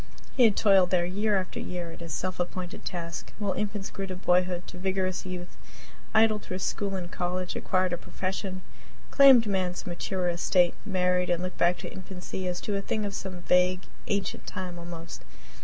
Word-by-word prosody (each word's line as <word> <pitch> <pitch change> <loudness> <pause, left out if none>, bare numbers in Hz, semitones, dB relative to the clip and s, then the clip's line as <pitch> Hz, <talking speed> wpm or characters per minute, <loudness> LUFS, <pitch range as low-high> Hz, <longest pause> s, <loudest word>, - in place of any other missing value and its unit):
He 250 - +6
had 215 -3 +4
toiled 195 -4 +5
there 175 -2 +3
year 205 +3 +1
after 185 - -5
year, 175 -2 -4
at - - -11
his 170 -1 -7
self 185 0 -3
appointed 180 0 -4
task, 170 -1 -5
while 205 -3 -1
infants 205 -1 -3
grew 195 -1 -4
to 185 - -4
boyhood 180 0 +2
to 180 - -9
vigorous 190 0 -1
youth 180 -1 -6 0.6
idled 220 -1 +4
through 185 - -5
school 195 +1 -2
and 180 -2 -5
college 180 0 -2
acquired 185 -1 +1
a - - 0
profession 185 0 -4 0.5
claimed 270 -5 +8
man's 185 -3 -1
mature 180 +1 -2
estate 175 +1 +3
married 180 -2 +2
and 175 0 +1
looked 185 0 -5
back 175 +1 +4
to - - -7
infancy 185 0 -6
as 180 0 -1
to 205 - -2
a 200 - 0
thing 215 +1 -1
of 200 - -3
some 185 -3 -5
vague, 180 +1 +3 0.2
ancient 200 -1 -2
time, 180 -2 -5
almost. 170 -1 -8
185 Hz, 185 wpm, -28 LUFS, 180-195 Hz, 0.6 s, claimed